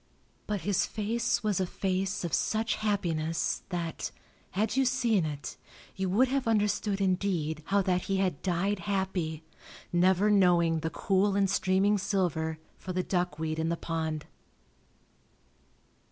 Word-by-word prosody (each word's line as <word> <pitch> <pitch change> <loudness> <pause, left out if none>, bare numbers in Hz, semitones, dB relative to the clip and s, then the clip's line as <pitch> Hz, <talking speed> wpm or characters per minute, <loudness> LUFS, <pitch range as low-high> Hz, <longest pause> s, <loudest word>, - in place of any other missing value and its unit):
But 210 -3 -1
his 195 +1 +1
face 225 +3 -1
was 210 -4 +1
a 185 - 0
face 190 0 -1
of 170 - -3
such 220 0 +1
happiness 165 -7 -1
that, 170 -3 -3 0.4
had 210 +4 -1
you 270 - +4
seen 240 -8 +2
it, 145 -1 -6 0.4
you 190 -1 -1
would 235 +8 +4
have 270 -2 0
understood 210 -2 +1
indeed 180 -5 0
how 200 0 +3
that 180 -1 0
he 195 - 0
had 185 -6 0
died 190 +3 0
happy, 180 -4 -2 0.5
never 190 +4 +4
knowing 175 -4 +4
the 160 - -2
cool 195 +3 +1
and 200 -1 +3
streaming 195 +2 +2
silver 175 -5 0 0.2
for 185 - -5
the 185 0 0
duckweed 160 -4 -1
in 160 0 0
the 170 - -1
pond. 160 -2 -3
190 Hz, 140 wpm, -29 LUFS, 170-205 Hz, 0.5 s, you